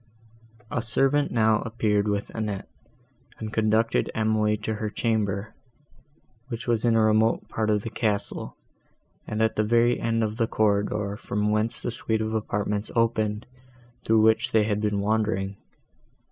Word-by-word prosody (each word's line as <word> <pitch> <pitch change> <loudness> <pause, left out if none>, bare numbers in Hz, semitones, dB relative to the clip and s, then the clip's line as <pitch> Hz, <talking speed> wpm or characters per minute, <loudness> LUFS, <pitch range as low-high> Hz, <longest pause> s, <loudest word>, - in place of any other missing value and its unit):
A - - 0
servant 135 +6 +1
now 110 -2 +3
appeared 105 -2 0
with 100 -1 -2
Annette, 105 -3 -4 0.7
and 110 -1 -6
conducted 110 +1 +2
Emily 110 -1 +1
to 110 +1 -3
her 110 0 -3
chamber, 105 -2 -1 0.9
which 120 -2 -6
was 115 -3 0
in 115 -1 +3
a 110 - +4
remote 110 +1 +2
part 110 -1 -1
of 105 -1 +1
the 115 - -5
castle, 105 -4 -2 0.7
and 110 +1 0
at 110 - 0
the 110 - +3
very 120 +2 +3
end 115 -1 0
of 110 0 -2
the 115 -2 +1
corridor, 105 -1 0
from 105 0 -1
whence 110 +3 0
the - - -2
suite 110 -1 -2
of 110 0 -2
apartments 105 -1 -2
opened, 110 -2 +1 0.6
through 110 0 +3
which 110 +1 +3
they 110 -1 +5
had 105 -1 -1
been 105 -2 0
wandering. 105 -2 0
110 Hz, 155 wpm, -25 LUFS, 105-115 Hz, 0.9 s, they